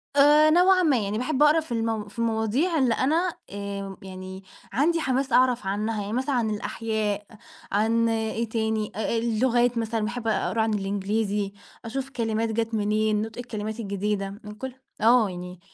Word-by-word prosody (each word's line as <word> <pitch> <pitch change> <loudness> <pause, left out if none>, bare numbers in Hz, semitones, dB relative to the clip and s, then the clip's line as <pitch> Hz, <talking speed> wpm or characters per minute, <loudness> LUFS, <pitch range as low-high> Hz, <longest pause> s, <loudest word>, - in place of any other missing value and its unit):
آآ، 295 +2 +6
نوعًا 365 +3 +5
ما، 295 -6 +4
يعني 200 +2 -2
باحب 260 +4 +1
أقرا 300 +2 +6
في 315 -6 -8
الم 225 -2 -1
في 205 - -11
المواضيع 230 - +1
اللي 255 -5 +3
أنا 325 +9 +1 0.2
آآ 200 -1 -5
يعني 190 0 -8 0.3
عندي 320 +8 +2
حماس 265 -1 0
أعرف 250 -4 +3
عنّها، 210 +2 -1
يعني 205 +1 -4
مثلًا 260 +2 0
عن 230 -3 +1
الأحياء 215 -1 -2 0.5
عن 225 +3 +2
إيه 225 0 -1
تاني، 220 -1 -1
أ - - -5
أ 220 +2 0
اللغات 240 +1 +2
مثلًا 225 0 -1
باحب 235 +1 -4
أقرا 225 +1 +1
عن 220 0 +1
الإنجليزي 200 0 -1 0.3
أشوف 270 +3 -4
كلمات 225 -3 -1
جات 225 +1 -1
منين 215 0 +1
نطق 220 0 -6
الكلمات 220 -2 -5
الجديدة، 200 -1 -2
من 210 - -8
كل 260 +4 -6 0.3
آه 230 -1 +5
يعني. 180 0 -8
225 Hz, 170 wpm, -25 LUFS, 210-250 Hz, 0.5 s, آآ